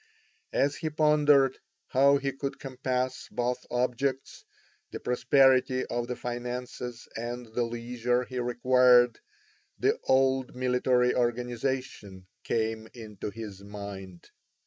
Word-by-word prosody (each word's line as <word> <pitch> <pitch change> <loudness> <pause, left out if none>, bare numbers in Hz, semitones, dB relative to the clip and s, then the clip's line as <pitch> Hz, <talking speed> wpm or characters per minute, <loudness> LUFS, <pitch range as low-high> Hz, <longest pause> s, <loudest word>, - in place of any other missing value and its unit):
As 140 +1 +2
he 160 - -2
pondered 150 -3 +4 0.3
how 140 +2 +5
he 140 0 -2
could 135 +1 -5
compass 130 -1 -3
both 125 +1 -2
objects, 130 +2 -2 0.5
the - - -7
prosperity 130 0 +3
of 120 0 -3
the 125 - -3
finances 125 0 -5
and 120 +2 -5
the 120 - 0
leisure 120 +1 -1
he 125 0 -5
required, 125 0 +4 0.6
the 430 +3 +1
old 130 -1 +2
military 125 0 +2
organisation 120 -4 -2 0.2
came 110 0 -1
into 105 -4 -7
his 105 -2 -8
mind. 100 -3 -9
125 Hz, 110 wpm, -28 LUFS, 120-130 Hz, 0.6 s, how